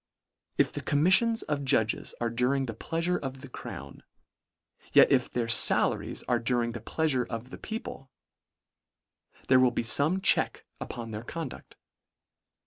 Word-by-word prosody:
If - - +2
the - - -5
commiffions 190 +10 +3
of 145 -2 -3
judges 110 -4 0
are 120 -1 -1
during 125 +3 0
the 115 - -5
pleafure 165 +9 -2
of 135 -1 -7
the 140 - -10
crown, 125 - -9 0.9
yet - - +6
if - - +2
their 120 -2 -2
fala 115 - +4
ries - - -7
are 120 -1 0
during 120 0 -1
the 115 -1 -7
pleasure 130 0 -1
of 115 +2 -6
the - - -9
people, 220 - -7 1.4
there 130 -1 +5
will 130 -1 +5
be 120 - -3
fome 145 +10 +3
check - - +1
upon 115 -2 -7
their 110 +1 -6
conduct. 155 +1 -8
130 Hz, 150 wpm, -28 LUFS, 120-155 Hz, 1.4 s, yet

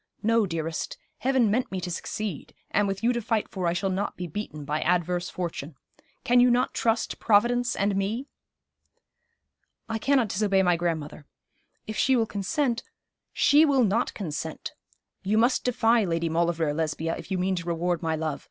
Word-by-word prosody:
'No, 225 -1 +3
dearest; 165 -2 -3 0.2
Heaven 255 -5 +2
meant 245 +4 0
me 190 - -2
to 180 0 -4
succeed; 195 -1 -5 0.2
and 205 0 +2
with 195 +1 -3
you 240 +2 +3
to 240 - -2
fight 220 -1 0
for 185 -3 -3
I 170 - +2
shall 190 +2 -1
not 195 +2 -2
be 180 - -4
beaten 155 -4 -6
by 150 +2 -1
adverse 175 0 0
fortune. 165 -4 -5 0.5
Can 245 +1 +4
you 250 +1 +6
not 245 +1 +2
trust 225 0 0
Providence 240 +3 +3
and 200 0 +1
me?' 210 +7 -1 1.6
'I 225 0 -2
cannot 260 -3 +2
disobey 195 -1 +2
my 180 -1 +3
grandmother. 160 -3 -3 0.6
If 215 -1 -5
she 265 +6 +3
will 230 -2 +2
consent 235 - -1 0.3
' - - -59
'She 295 +2 +7
will 280 -5 +4
not 225 +3 +1
consent. 160 -4 -5 0.5
You 205 +3 +1
must 240 +3 +3
defy 235 -2 +3
Lady 165 -2 -1
Maulevrier, 165 -2 +1
Lesbia, 160 +1 -2
if 165 - -10
you 190 - -1
mean 185 +1 0
to 170 0 -5
reward 175 0 -1
my 160 -2 0
love. 155 -2 -3
195 Hz, 180 wpm, -26 LUFS, 170-230 Hz, 1.6 s, She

